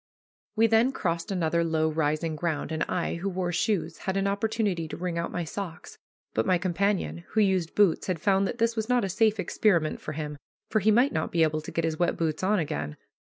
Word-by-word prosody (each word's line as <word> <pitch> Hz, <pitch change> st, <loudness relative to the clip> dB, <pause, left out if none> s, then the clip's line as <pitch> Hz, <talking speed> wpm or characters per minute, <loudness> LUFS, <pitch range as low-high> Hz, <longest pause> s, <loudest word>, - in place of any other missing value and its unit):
We 225 Hz, +1 st, +4 dB
then 225 Hz, +3 st, +4 dB
crossed 170 Hz, -4 st, -2 dB
another 170 Hz, -2 st, +1 dB
low 160 Hz, -1 st, +1 dB
rising 155 Hz, 0 st, 0 dB
ground, 160 Hz, -1 st, -2 dB
and 160 Hz, 0 st, -2 dB
I, 170 Hz, -1 st, -1 dB
who 190 Hz, +4 st, -2 dB
wore 180 Hz, -1 st, -2 dB
shoes, 175 Hz, -2 st, -1 dB
had 190 Hz, 0 st, -2 dB
an 195 Hz, -, +1 dB
opportunity 200 Hz, -4 st, 0 dB
to -, -, -7 dB
wring 175 Hz, -1 st, -2 dB
out 170 Hz, -, -2 dB
my 175 Hz, -, -2 dB
stockings, 170 Hz, 0 st, -7 dB, 0.3 s
but 110 Hz, -, +1 dB
my 185 Hz, -, +4 dB
companion, 185 Hz, +1 st, 0 dB
who 220 Hz, -, +2 dB
used 190 Hz, -5 st, +1 dB
boots, 200 Hz, -5 st, +3 dB
had 180 Hz, -3 st, -1 dB
found 195 Hz, +2 st, +2 dB
that -, -, -4 dB
this 230 Hz, 0 st, +1 dB
was 220 Hz, +1 st, -2 dB
not 245 Hz, -3 st, +3 dB
a -, -, -3 dB
safe 215 Hz, +2 st, +2 dB
experiment 175 Hz, -3 st, +1 dB
for 155 Hz, -, -5 dB
him, 150 Hz, -1 st, -5 dB, 0.3 s
for 220 Hz, -, +3 dB
he 215 Hz, +2 st, +2 dB
might 245 Hz, +6 st, +4 dB
not -, -, -1 dB
be 165 Hz, -1 st, +3 dB
able 155 Hz, 0 st, +1 dB
to 155 Hz, -, -8 dB
get 165 Hz, -, 0 dB
his 160 Hz, 0 st, -2 dB
wet 175 Hz, -, +1 dB
boots 160 Hz, -2 st, -1 dB
on 205 Hz, +3 st, +2 dB
again. 75 Hz, -, -3 dB
175 Hz, 225 wpm, -27 LUFS, 160-205 Hz, 0.3 s, We